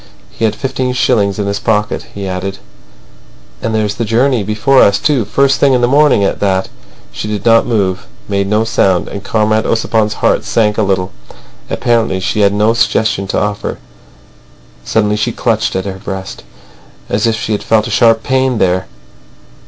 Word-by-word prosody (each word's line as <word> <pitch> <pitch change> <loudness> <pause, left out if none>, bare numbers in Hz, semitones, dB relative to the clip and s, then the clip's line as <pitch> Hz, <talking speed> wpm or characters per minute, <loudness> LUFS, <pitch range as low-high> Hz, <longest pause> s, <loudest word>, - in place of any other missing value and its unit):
He 115 - -2
had 110 - 0
fifteen 130 -1 -2
shillings 105 -6 +1
in 105 - -2
his 100 0 -2
pocket. 105 -1 -1
He 100 -1 -5
added: 95 +1 -4 1.0
"And 110 -1 -2
there's 105 -1 0
the 115 - -3
journey 120 +2 +1
before 110 +7 +2
us, 100 0 +4
too—first 135 0 +1
thing 140 -2 +4
in 125 - +1
the 120 - +3
morning 140 -5 +3
at 95 - -1
that." 95 -2 0 0.4
She 60 +8 -6
did 105 0 -4
not 115 0 +4
move, 100 -6 -1 0.2
made 100 -1 -1
no 105 +2 +1
sound, 95 -5 +1
and 100 -1 -7
Comrade 110 +1 0
Ossipon's 110 -1 0
heart - - +1
sank 105 -2 0
a - - +3
little. 95 -2 0 0.6
Apparently 115 -6 0
she 95 +3 -2
had 100 -1 +4
no 105 +2 +2
suggestion 110 -4 0
to - - -1
offer. 105 +1 -3 1.1
Suddenly 105 -1 0
she 105 - -1
clutched - - -1
at 95 0 -2
her 95 -1 -5
breast, 95 -1 -6 0.6
as 105 +3 0
if 115 - +1
she 115 -1 -4
had 105 - -1
felt 110 -1 +1
a - - -5
sharp 115 -2 +3
pain 130 -1 +1
there. 90 - 0
105 Hz, 175 wpm, -14 LUFS, 100-115 Hz, 1.1 s, us